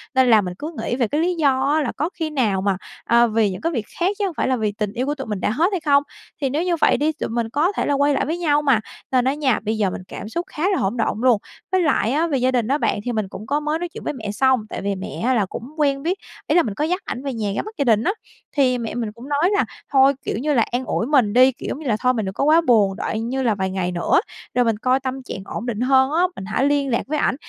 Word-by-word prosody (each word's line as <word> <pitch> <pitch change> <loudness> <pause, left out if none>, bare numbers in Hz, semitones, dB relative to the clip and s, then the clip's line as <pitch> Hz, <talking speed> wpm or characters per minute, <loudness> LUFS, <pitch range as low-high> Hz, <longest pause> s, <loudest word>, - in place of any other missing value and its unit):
nên 260 -1 +4
là 220 -2 +6
mình 180 -2 -4
cứ 310 +2 -5
nghĩ - - -1
về 245 -3 +1
cái 295 +7 0
lý 355 +2 +1
do 280 -5 +2
á, 310 - +2
là 270 - -1
có 310 - 0
khi 320 -3 -3
nào 225 -10 0
mà, 195 -1 +1 0.3
à, 235 0 +4
vì 220 -2 +2
những 185 - -7
cái 330 - 0
việc 230 -9 -2
khác 350 - +2
chứ 410 - +1
hông 375 - -3
phải - - +1
là 260 - +2
vì 215 -3 -1
tình 205 0 -3
yêu 250 +3 -1
của 290 +1 -1
tụi 270 -4 -7
mình 210 -3 -3
đã - - +1
hết 315 +10 +2
hay 375 - 0
không, 285 -2 +3 0.4
thì 275 - +1
nếu 300 +6 0
như 355 -1 +1
vậy 325 - +3
đi, 305 +2 +1
tụi 310 - -5
mình 230 -1 -2
có 300 - +1
thể - - +1
là - - +1
quay 285 +1 +3
lại - - 0
với 320 +5 -2
nhau 295 -4 +2
mà, 275 -6 +3 0.3
nên 255 -1 +3
á 265 - +2
nha, 280 -5 +1
bây 220 +1 -2
giờ 205 -3 +1
mình 185 - -6
cảm 210 - -7
xúc 340 +9 -3
khá 325 -5 -6
là 390 - +1
hỗn 195 +6 -1
độn 225 -1 -1
luôn. 250 -3 +5 0.3
Với 375 -1 +3
lại 270 - +2
á 315 +5 +1
về 290 -4 0
gia 255 0 +2
đình 240 -4 0
á 275 +3 +2
bạn, 300 - 0
thì 245 - -1
mình 215 -4 -1
cũng 210 +2 -9
có 290 +4 +1
mới 300 +1 -1
nói 350 - -3
chuyện - - -10
với - - -2
mẹ 220 -6 -5
xong, 260 +4 +3
tại - - -5
vì 200 0 -1
mẹ 170 -4 -6
á 260 - +3
là 220 -5 +2
cũng 190 - -7
quen 280 -2 +1
biết, 360 +4 0 0.3
ý - - +2
là 350 - +5
mình 215 - -3
có 290 - -2
dắt 360 +4 -1
ảnh 255 - -5
về 275 -2 -3
nhà 215 -3 -2
ra - - 0
mắt 430 +2 -10
gia 285 - +1
đình 225 -2 +3
á. 380 - +2 0.5
Thì 255 -3 +3
mẹ 230 -2 -4
mình 230 -3 -2
cũng 235 +6 -12
nói 295 +5 +2
là 405 - +2 0.3
thôi, 270 0 +6
kiểu - - -2
như 295 +6 0
là 235 -4 +4
an 250 +2 -1
ủi 225 - -1
mình 255 -8 +3
đi, 255 +2 +6
kiểu, 255 - -9
giống - - -4
như 310 - -6
là, 225 - +2
thôi 250 +2 +2
mình 220 -4 -2
đừng 190 - -4
có - - -1
quá 310 +3 +5
buồn, 215 -10 +3
đợi 215 - -3
như 255 +4 -2
là 225 -4 +2
vài 190 -1 -1
ngày 185 -1 -2
nữa 175 -1 +2 0.3
rồi 245 0 +2
mình 225 -2 +1
coi 255 +4 +2
tâm 265 0 -4
trạng 220 - -6
ổn 220 - -5
định 235 -2 -3
hơn 265 +1 +4
á, 335 +3 +2
mình 190 - -7
hãy 265 - 0
liên 285 -1 +1
lạc 235 - +1
với 305 +2 -1
ảnh, - - +1
260 Hz, 320 wpm, -21 LUFS, 220-295 Hz, 0.5 s, là